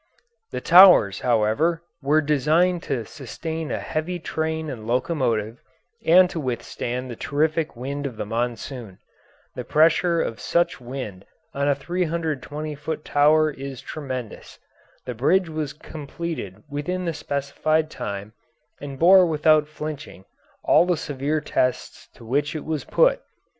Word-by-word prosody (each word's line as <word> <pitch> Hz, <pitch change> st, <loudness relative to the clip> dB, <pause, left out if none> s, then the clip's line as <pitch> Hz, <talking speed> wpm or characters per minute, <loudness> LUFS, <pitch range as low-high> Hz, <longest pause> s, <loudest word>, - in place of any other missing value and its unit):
The -, -, -5 dB
towers, 175 Hz, -, +7 dB
however, 125 Hz, +9 st, +1 dB, 0.2 s
were 150 Hz, +3 st, +3 dB
designed 155 Hz, +5 st, +2 dB
to 125 Hz, -5 st, -1 dB
sustain 160 Hz, +5 st, -6 dB
a -, -, -1 dB
heavy 165 Hz, +3 st, -3 dB
train 160 Hz, -1 st, -3 dB
and 115 Hz, -6 st, -7 dB
locomotive 120 Hz, -4 st, -1 dB, 0.4 s
and 180 Hz, +3 st, +6 dB
to 165 Hz, -, -4 dB
withstand 125 Hz, -1 st, -4 dB
the -, -, -6 dB
terrific 155 Hz, +2 st, -1 dB
wind 140 Hz, +4 st, -4 dB
of 120 Hz, -5 st, -9 dB
the -, -, -3 dB
monsoon. 120 Hz, -2 st, -4 dB, 0.6 s
The -, -, -5 dB
pressure 165 Hz, +2 st, +3 dB
of 115 Hz, -, -2 dB
such 170 Hz, 0 st, 0 dB
a -, -, -17 dB
wind 120 Hz, -7 st, -7 dB, 0.3 s
on 140 Hz, +1 st, -1 dB
a 145 Hz, -, +3 dB
320 155 Hz, -2 st, -3 dB
foot 150 Hz, +1 st, -5 dB
tower 155 Hz, +1 st, +4 dB
is 135 Hz, -2 st, -7 dB
tremendous. 130 Hz, -7 st, -7 dB, 0.5 s
The 125 Hz, -, -4 dB
bridge 165 Hz, +10 st, +2 dB
was 155 Hz, -3 st, -3 dB
completed 150 Hz, -, -7 dB
within 155 Hz, +6 st, -3 dB
the 165 Hz, -, -1 dB
specified 155 Hz, +2 st, -1 dB
time 100 Hz, +1 st, -6 dB, 0.5 s
and 140 Hz, -1 st, -7 dB
bore 185 Hz, +3 st, +7 dB
without 155 Hz, -1 st, +3 dB
flinching 150 Hz, -9 st, -7 dB, 0.4 s
all 175 Hz, -, +4 dB
the 180 Hz, -2 st, +1 dB
severe 145 Hz, +1 st, -2 dB
tests 125 Hz, -3 st, -2 dB
to 115 Hz, -, -14 dB
which 145 Hz, +6 st, -1 dB
it 155 Hz, -, -5 dB
was 155 Hz, -2 st, -3 dB
put. -, -, +3 dB
150 Hz, 140 wpm, -23 LUFS, 130-160 Hz, 0.6 s, towers